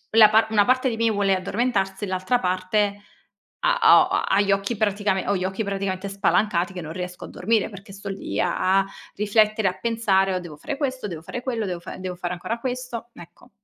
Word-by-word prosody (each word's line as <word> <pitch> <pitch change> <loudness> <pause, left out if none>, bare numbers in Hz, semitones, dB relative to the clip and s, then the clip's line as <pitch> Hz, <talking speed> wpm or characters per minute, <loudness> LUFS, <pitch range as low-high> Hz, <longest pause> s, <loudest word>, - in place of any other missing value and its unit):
la 220 -1 +8
par 220 +1 +4
una 210 -2 +4
parte 255 +2 +2
di 230 - -2
me 230 0 +2
vuole 200 -2 +2
addormentarsi 195 0 -1
e - - -3
l'altra 185 +6 0
parte, 200 +2 0 0.6
ha - - +2 0.2
ho 370 - +2
ha 390 +1 +1
ha 195 - +3
gli 200 -1 +1
occhi 195 +4 0
praticamen 205 -2 0
ho 200 - +2
gli 185 - -2
occhi 190 +4 -2
praticamente 195 -1 -3
spalancati 195 -1 +1
che 185 - -6
non 160 -1 -7
riesco 180 0 -6
a - - -12
dormire 220 +3 0
perché 200 0 -12
sto 200 0 -8
lì 195 - -3
a 190 +1 +2
a, 195 - -2 0.3
riflettere 215 0 +2
e - - +1
a - - -17
pensare: 200 -5 +1
"Oh, 185 - -1
devo 165 -4 -10
fare 280 - -5
questo, 260 -5 -2
devo 170 -5 -6
fare 245 +9 -6
quello, 235 -4 -2
devo 180 -2 -4
fa - - -9
devo 185 -1 -5
fare 175 0 -4
ancora 180 +6 -4
questo"; 250 -2 -5
ecco. 175 +8 -15
200 Hz, 225 wpm, -24 LUFS, 185-225 Hz, 0.6 s, la